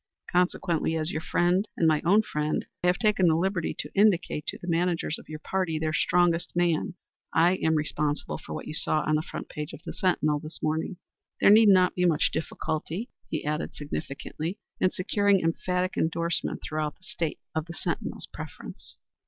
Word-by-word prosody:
Consequently, 175 -2 +1
as 160 +1 -1
your 155 - -2
friend 180 +5 +2
and 165 - +3
my 155 -1 +3
own 200 +6 +5
friend, 150 -5 -1 0.2
I - - +3
have 180 0 +3
taken 210 -5 +3
the 160 - +4
liberty 185 +1 0
to - - -5
indicate 195 -7 +2
to - - -3
the 175 - -10
managers 170 -2 0
of - - -16
your 155 - -5
party 170 0 -1
their 155 0 -1
strongest 175 +1 +2
man. 175 -1 +1 0.4
I 175 +3 +5
am 160 -2 +2
responsible 150 0 -1
for - - -7
what - - -6
you - - -5
saw 155 0 +1
on 155 - 0
the 155 - +3
front - - -7
page 150 -1 -6
of - - -9
the - - -5
Sentinel 155 -5 +1
this 155 +2 -7
morning. 160 +3 -1 0.4
There - - +6
need 215 0 +8
not 185 -2 +5
be 180 - +1
much 160 -4 +3
difficulty," 165 - -3 0.2
he 155 - -3
added, 150 +1 -2
significantly, 155 +4 -5 0.2
"in 185 - +4
securing 200 0 +2
emphatic 180 +2 0
endorsement 170 +1 -1
throughout 155 -1 -2
the - - -27
State 165 -4 -3 0.2
of 160 +1 -2
the 170 - -8
Sentinel's - - -3
preference." - - -9
170 Hz, 185 wpm, -27 LUFS, 155-180 Hz, 0.4 s, need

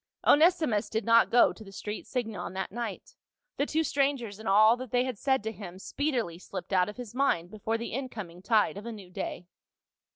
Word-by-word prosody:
Onesimus 300 - +4
did 220 +1 -2
not 230 0 +5
go 240 - +5
to 220 - -12
the 195 - -12
street 210 +2 -6
Singon 215 -9 -3
that 190 0 -3
night; 230 -2 -5 0.4
the 285 - +1
two 320 +1 +1
strangers 270 -8 0
and 220 - -4
all 215 +3 +6
that 255 0 -7
they 245 +2 +2
had 255 -5 -4
said 265 -5 +1
to 220 - -2
him 185 -4 -9
speedily 235 - -2
slipped 185 0 -7
out 185 +1 +3
of 210 - -9
his 245 -4 -8
mind 190 -10 +1
before 220 +1 -2
the 235 - -6
in 260 +1 -3
coming 180 -7 -8
tide 210 -1 +2
of 210 +3 -7
a - - -4
new 200 -5 -10
day. 175 0 -5
220 Hz, 215 wpm, -29 LUFS, 195-250 Hz, 0.4 s, all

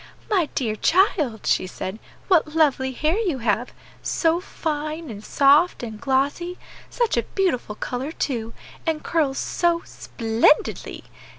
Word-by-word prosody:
"My 365 -7 +3
dear 225 -5 0
child," 310 - +2
she - - +2
said, 190 +3 -6 0.3
"what 320 -5 +3
lovely 275 -4 +3
hair 310 - 0
you 365 -11 0
have! 230 0 0 0.3
so 330 0 +1
fine, 310 -3 -4
and 205 -1 -9
soft, 285 +6 +4
and 220 -2 -7
glossy; 285 +7 0 0.3
such 475 - 0
a - - +4 0.2
beautiful 310 - 0
color, 255 +6 -4
too, 230 -8 -3 0.3
and 315 -1 0
curls 290 -5 0
so 345 -1 +1
_splendidly! 230 +2 0
290 Hz, 130 wpm, -23 LUFS, 240-335 Hz, 0.3 s, soft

